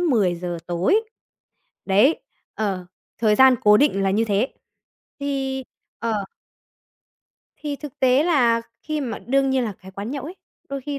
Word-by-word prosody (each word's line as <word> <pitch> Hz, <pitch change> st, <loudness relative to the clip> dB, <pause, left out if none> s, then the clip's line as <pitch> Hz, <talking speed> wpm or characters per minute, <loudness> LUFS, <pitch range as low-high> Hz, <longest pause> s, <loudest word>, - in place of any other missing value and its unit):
10:00 180 Hz, -, +1 dB
tối. 180 Hz, -, +2 dB, 0.8 s
Đấy, 210 Hz, +11 st, +4 dB, 0.3 s
ờ, 195 Hz, -4 st, -2 dB, 0.3 s
thời 215 Hz, -2 st, +3 dB
gian 260 Hz, +2 st, +7 dB
cố 210 Hz, 0 st, +7 dB
định 240 Hz, -8 st, +3 dB
là 195 Hz, -, +2 dB
như 215 Hz, +4 st, +2 dB
thế. 210 Hz, +4 st, +1 dB, 0.7 s
Thì 270 Hz, -2 st, -2 dB, 0.3 s
ờ. 220 Hz, -3 st, -1 dB, 1.3 s
Thì 290 Hz, -2 st, -4 dB
thực 295 Hz, -3 st, -10 dB
tế 260 Hz, +2 st, +4 dB
là 245 Hz, -9 st, +3 dB, 0.2 s
khi 305 Hz, -1 st, -2 dB
mà 240 Hz, -6 st, -4 dB
đương 270 Hz, +2 st, +1 dB
nhiên 260 Hz, -2 st, +1 dB
là 215 Hz, -, -3 dB
cái 190 Hz, 0 st, -14 dB
quán 200 Hz, +4 st, -6 dB
nhậu 275 Hz, -1 st, -4 dB
ấy, 345 Hz, +5 st, -8 dB, 0.3 s
đôi 275 Hz, 0 st, -4 dB
khi 280 Hz, +1 st, -4 dB
245 Hz, 155 wpm, -23 LUFS, 205-275 Hz, 1.3 s, gian